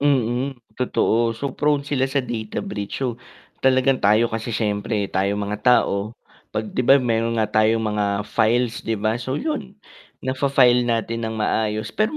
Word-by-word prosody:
Mm, 135 Hz, -1 st, +1 dB, 0.2 s
totoo, 115 Hz, -2 st, +1 dB
so 135 Hz, +2 st, -3 dB
prone 145 Hz, -1 st, +1 dB
sila 135 Hz, -2 st, 0 dB
sa 135 Hz, -1 st, -1 dB
data 110 Hz, -3 st, -4 dB
breach 105 Hz, +5 st, -4 dB
so, 120 Hz, -1 st, -3 dB, 0.4 s
talagang 130 Hz, 0 st, +3 dB
tayo 110 Hz, +3 st, +3 dB
kasi 115 Hz, +1 st, -3 dB
siyempre 105 Hz, -2 st, -1 dB
tayong 100 Hz, +2 st, 0 dB
mga 105 Hz, +1 st, -4 dB
tao, 110 Hz, -3 st, +2 dB, 0.3 s
'pag 110 Hz, 0 st, -4 dB
'di -, -, -1 dB
ba 135 Hz, +3 st, +6 dB
yung 130 Hz, -, -1 dB
mayro'n 115 Hz, 0 st, +1 dB
nga 110 Hz, -1 st, +1 dB
tayong 110 Hz, +1 st, +2 dB
mga 105 Hz, -1 st, 0 dB, 0.2 s
files 115 Hz, +2 st, +1 dB
'di 115 Hz, 0 st, -2 dB
ba? 110 Hz, +3 st, -1 dB
So 130 Hz, +3 st, -3 dB
'yun, 245 Hz, -, -4 dB, 0.5 s
nafa-file 130 Hz, -2 st, +3 dB
natin 115 Hz, 0 st, -1 dB
nang 110 Hz, -, -5 dB
maayos 110 Hz, 0 st, -1 dB
pero 215 Hz, +8 st, 0 dB
115 Hz, 170 wpm, -22 LUFS, 110-130 Hz, 0.5 s, ba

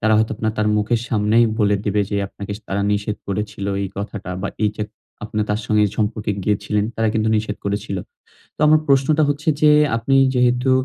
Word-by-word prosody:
তারা 110 Hz, 0 st, +2 dB
হয়তো 110 Hz, 0 st, +1 dB
আপনার 110 Hz, 0 st, -1 dB
তার 105 Hz, 0 st, +2 dB
মুখের 110 Hz, +2 st, +1 dB
সামনেই 110 Hz, +1 st, +3 dB
বলে 105 Hz, -2 st, +3 dB
দিবে 105 Hz, 0 st, +1 dB
যে 100 Hz, -, 0 dB
আপনাকে 100 Hz, 0 st, -7 dB, 0.2 s
তারা 100 Hz, +1 st, -1 dB
নিষেধ 105 Hz, +1 st, -2 dB
করেছিল 105 Hz, 0 st, -3 dB, 0.2 s
এই 100 Hz, -, -2 dB
কথাটা। 100 Hz, -2 st, -5 dB
বা -, -, -1 dB, 0.2 s
এইযে 105 Hz, 0 st, -1 dB, 0.4 s
আপনি 105 Hz, 0 st, -3 dB
তার 105 Hz, +1 st, 0 dB
সঙ্গে 105 Hz, -1 st, +3 dB, 0.2 s
সম্পর্কে 105 Hz, -1 st, -1 dB
গিয়েছিলেন 105 Hz, +1 st, 0 dB
তারা 115 Hz, 0 st, +1 dB
কিন্তু 110 Hz, 0 st, +1 dB
নিষেধ 105 Hz, -1 st, -2 dB
করেছিল। 100 Hz, 0 st, -2 dB, 0.6 s
তো -, -, -12 dB
আমার 155 Hz, 0 st, +5 dB
প্রশ্নটা 140 Hz, +2 st, +3 dB
হচ্ছে 145 Hz, +2 st, -2 dB
যে 150 Hz, -, +6 dB, 0.3 s
আপনি 115 Hz, +4 st, 0 dB, 0.2 s
যেহেতু 125 Hz, +1 st, +2 dB
105 Hz, 185 wpm, -20 LUFS, 105-120 Hz, 0.6 s, যে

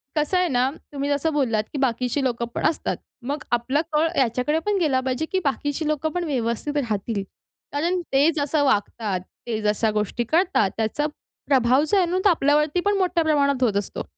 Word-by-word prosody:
कसं 305 Hz, +5 st, +1 dB
आहे 360 Hz, -1 st, +2 dB
ना, 255 Hz, -2 st, +2 dB, 0.2 s
तुम्ही 280 Hz, 0 st, -2 dB
जसं 290 Hz, +2 st, 0 dB
बोललात, 235 Hz, -7 st, +1 dB
की -, -, -3 dB
बाकीची 250 Hz, +1 st, 0 dB
लोकं 235 Hz, -2 st, -1 dB
पण -, -, -2 dB
असतात. 320 Hz, -, -3 dB, 0.3 s
मग 295 Hz, +2 st, -3 dB
आपला 255 Hz, +5 st, +1 dB
कळ 305 Hz, +2 st, +3 dB
ह्याच्याकडे 260 Hz, +5 st, +1 dB
पण 415 Hz, -1 st, +1 dB
गेला 280 Hz, -6 st, +2 dB
पाहिजे, 260 Hz, +4 st, -1 dB
की 380 Hz, -, +2 dB
बाकीची 290 Hz, +2 st, -1 dB
लोकं 305 Hz, +1 st, 0 dB
पण 355 Hz, -1 st, -1 dB
व्यवस्थित 270 Hz, 0 st, -2 dB
राहतील. 215 Hz, -4 st, -1 dB, 0.5 s
कारण 345 Hz, +5 st, 0 dB
ते 285 Hz, +4 st, +5 dB
जसं 290 Hz, 0 st, +1 dB
वागतात, 210 Hz, -5 st, 0 dB, 0.3 s
ते 220 Hz, -2 st, -2 dB
जशा 210 Hz, +1 st, +1 dB
गोष्टी 210 Hz, +3 st, -1 dB
करतात 320 Hz, -, +2 dB
त्याचा 225 Hz, +7 st, 0 dB, 0.4 s
प्रभाव 260 Hz, +1 st, +4 dB
जो 400 Hz, -, +2 dB
आहे 365 Hz, -, +4 dB
ना, 355 Hz, +2 st, -1 dB
तर -, -, +7 dB
आपल्यावरती 300 Hz, +1 st, +2 dB
पण 410 Hz, -1 st, +2 dB
मोठ्या 360 Hz, -3 st, +1 dB
प्रमाणात 280 Hz, -4 st, +2 dB
होत 210 Hz, -4 st, +2 dB
असतो. 200 Hz, -, -3 dB
280 Hz, 185 wpm, -23 LUFS, 235-310 Hz, 0.5 s, तर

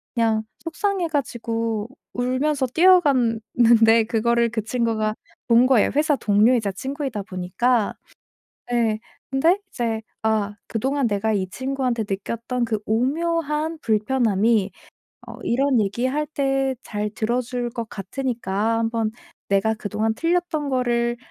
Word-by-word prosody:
그냥 220 Hz, -2 st, +2 dB, 0.2 s
속상해 365 Hz, +2 st, -1 dB
가지고 230 Hz, -6 st, -2 dB, 0.3 s
울면서 260 Hz, +3 st, 0 dB
뛰어갔는데 235 Hz, -, +4 dB
그거를 235 Hz, +1 st, +2 dB
그 220 Hz, -2 st, -3 dB
친구가 225 Hz, -2 st, 0 dB, 0.3 s
본 235 Hz, +1 st, +5 dB
거예요, 255 Hz, -5 st, +4 dB
회사 300 Hz, 0 st, +3 dB
동료이자 215 Hz, -1 st, +3 dB
친구이다 265 Hz, -2 st, -4 dB
보니까. 205 Hz, +5 st, 0 dB, 0.8 s
예. 225 Hz, -3 st, +1 dB, 0.3 s
근데 325 Hz, +8 st, +3 dB
이제 225 Hz, -2 st, -2 dB, 0.2 s
'아 215 Hz, -2 st, 0 dB
그동안 265 Hz, +4 st, 0 dB
내가 210 Hz, +2 st, 0 dB
이 190 Hz, -3 st, -1 dB
친구한테 260 Hz, 0 st, -2 dB
느꼈던 230 Hz, +5 st, -2 dB
그 220 Hz, -1 st, -1 dB
오묘한 305 Hz, +6 st, 0 dB
불편함이 220 Hz, -2 st, +2 dB, 0.6 s
어 -, -, -8 dB
이런 260 Hz, 0 st, +2 dB
얘기 205 Hz, +5 st, -1 dB
할 300 Hz, +3 st, -1 dB
때 270 Hz, -2 st, 0 dB
잘 210 Hz, 0 st, -3 dB
들어줄 240 Hz, +2 st, -2 dB
것 230 Hz, -2 st, -5 dB
같으니까 225 Hz, 0 st, -2 dB
한번 225 Hz, -1 st, 0 dB, 0.4 s
내가 200 Hz, +3 st, +2 dB
그동안 215 Hz, +1 st, -1 dB
틀렸던 330 Hz, -1 st, 0 dB
거를 240 Hz, -2 st, +1 dB
235 Hz, 270 characters per minute, -23 LUFS, 220-270 Hz, 0.8 s, 본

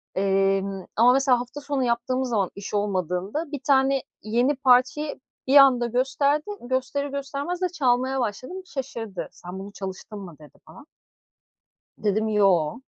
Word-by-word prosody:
Emm, 195 Hz, 0 st, +1 dB
ama 245 Hz, +3 st, +6 dB
mesela 265 Hz, -2 st, +3 dB
hafta 250 Hz, +4 st, -7 dB
sonu 280 Hz, -2 st, -1 dB
yaptığımız 250 Hz, +2 st, 0 dB
zaman 200 Hz, -6 st, +1 dB
iş 200 Hz, +1 st, -8 dB
olmadığında 200 Hz, -, -2 dB
bir 290 Hz, -, -4 dB
tane 270 Hz, -1 st, +3 dB, 0.2 s
yeni 240 Hz, +6 st, +1 dB
parçayı 280 Hz, +3 st, +2 dB, 0.3 s
bir 270 Hz, -, +3 dB
anda 255 Hz, -3 st, +7 dB
gösterdi, 280 Hz, +4 st, +1 dB, 0.2 s
gösterir 260 Hz, +3 st, -2 dB
göstermez 280 Hz, +6 st, -4 dB
de 365 Hz, -, +1 dB
çalmaya 260 Hz, -4 st, +1 dB
başladım 255 Hz, -, -4 dB
şaşırdı. 240 Hz, -, -6 dB
"Sen 180 Hz, +2 st, -9 dB
bunu 200 Hz, +1 st, -8 dB
çalıştın 195 Hz, +2 st, -7 dB
mı?" 175 Hz, -5 st, -10 dB
dedi 150 Hz, -1 st, -16 dB
bana, -, -, -14 dB, 1.1 s
dedim 215 Hz, +1 st, 0 dB
"yoo" 195 Hz, -3 st, +2 dB
245 Hz, 140 wpm, -24 LUFS, 200-275 Hz, 1.1 s, anda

